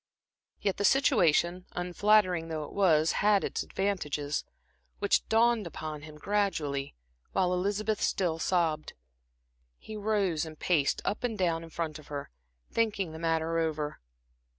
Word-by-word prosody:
Yet 195 -3 -1
the 205 - -1
situation, 180 - +3
unflattering 180 -1 +2
though 160 -2 -3
it 145 - -9
was, 165 -5 +4
had 205 -1 +3
its - - -2
advantages, 150 -7 -2 0.5
which 200 - +1
dawned 225 -2 +3
upon 155 -2 -6
him 150 0 -11
gradually, 150 - -1 0.4
while 180 -1 +2
Elizabeth 205 +3 -1
still 170 -4 0
sobbed. 165 -4 0 0.8
He 220 - -9
rose 200 -6 0
and 160 -1 -8
paced 150 -5 +1
up 210 - -2
and 230 -3 -1
down 170 -3 0
in 165 - -10
front 160 -1 -4
of 150 - -15
her, 145 -1 -6 0.4
thinking 205 -6 0
the 160 - -8
matter 165 0 0
over. 155 -2 -2
175 Hz, 140 wpm, -30 LUFS, 155-205 Hz, 0.8 s, was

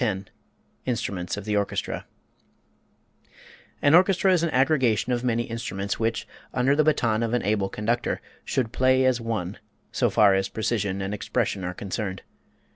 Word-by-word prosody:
X 100 -4 -2 0.6
INSTRUMENTS 100 -7 -2
OF 105 - -6
THE 105 -1 0
ORCHESTRA 100 -1 -2 1.8
An 145 - +5
orchestra 185 +2 +5
is 175 - +3
an 170 - +1
aggregation 130 -4 +2
of 120 0 -1
many 120 -1 +1
instruments 100 -4 -4
which, 115 0 -1 0.3
under 130 +3 +3
the 155 - +4
baton 120 -8 +2
of 115 +1 0
an 125 - 0
able 100 -1 +1
conductor, 115 +5 -1 0.2
should 120 -4 -1
play 130 0 +3
as 125 -2 +2
one, 105 -5 -3 0.3
so - - +1
far 105 -2 +5
as 95 0 +1
precision 105 -4 -1
and 95 +2 -3
expression 105 -1 -1
are 90 0 -4
concerned. 100 -1 -4
115 Hz, 155 wpm, -25 LUFS, 100-125 Hz, 1.8 s, An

